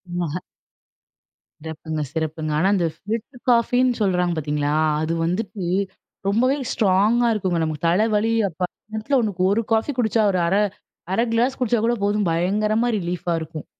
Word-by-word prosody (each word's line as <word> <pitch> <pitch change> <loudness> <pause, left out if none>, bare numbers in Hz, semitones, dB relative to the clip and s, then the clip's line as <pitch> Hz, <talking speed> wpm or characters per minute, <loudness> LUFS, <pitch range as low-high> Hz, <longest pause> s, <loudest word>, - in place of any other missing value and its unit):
ம்ம்ஹ. 170 -2 -2 1.3
சிறப்புங்க, 160 0 -4
சிறப்புங்க. 160 -1 -2
ஆனா 185 +4 +3
இந்த 175 -4 +1
ஃபில்டர் 225 +7 -5
காஃபின்னு 245 +1 +3
சொல்றாங்க 180 -3 +1
பார்த்தீங்களா? 150 -1 -1 0.3
அது 160 +1 -1
வந்துட்டு 190 +2 -2 0.6
ரொம்பவே 250 +7 +2
ஸ்ட்ராங்கா 215 +3 +3
இருக்குங்க. 185 -5 -1
நமக்கு 155 0 -3
தலைவலி 215 +4 +2 0.2
அப்ப 165 +1 -16 0.3
நேரத்துல 220 +6 0 0.4
1 230 +2 +1
காஃபி 225 +6 +1
குடிச்சா 220 -1 +2
ஒரு 185 - 0
அரை 195 +4 +3 0.5
1/2 230 - +2
கிளாஸ் 245 +3 +1
குடிச்சா 240 -2 +1
கூட 235 - +2
போதும் 205 0 +1
பயங்கரமா 210 +7 +1
ரிலீஃப்பா 175 -1 -2
இருக்கும். 160 -1 -7
195 Hz, 135 wpm, -22 LUFS, 170-225 Hz, 1.3 s, ஆனா